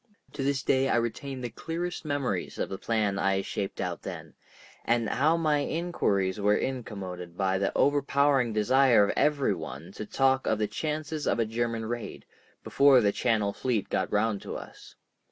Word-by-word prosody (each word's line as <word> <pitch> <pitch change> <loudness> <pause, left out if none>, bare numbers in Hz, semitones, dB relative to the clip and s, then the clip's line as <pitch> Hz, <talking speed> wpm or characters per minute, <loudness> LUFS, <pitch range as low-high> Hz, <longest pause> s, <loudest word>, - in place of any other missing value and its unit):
To - - -5
this 135 0 0
day 135 0 +2
I - - +2
retain 125 +3 -2
the 120 -2 -4
clearest 165 +7 -4
memories 135 -11 -2
of - - -2
the 95 - -5
plan 105 -4 0
I 95 0 +1
shaped 100 0 -4
out - - -3
then, - - -8 0.5
and 115 -1 +1
how 155 +8 +2
my 155 -3 +2
inquiries 110 - -1
were 105 +1 +3
incommoded 95 -9 -5
by 95 -1 +1
the 100 - 0
overpowering 140 -3 +3
desire 120 +2 +4
of - - -1
every 145 -7 +2
one 80 -2 -7
to 105 - -7
talk 135 +1 +2
of 110 - +2
the 105 - +1
chances 155 +4 -3
of - - +2
a 115 - +1
German 115 0 -2
raid, 120 +1 -5 0.4
before 140 -2 +5
the 105 -4 +3
Channel 105 -3 0
Fleet 120 -6 -1
got - - -1
round 105 -1 +1
to - - -6
us. - - -12
120 Hz, 175 wpm, -28 LUFS, 100-140 Hz, 0.5 s, before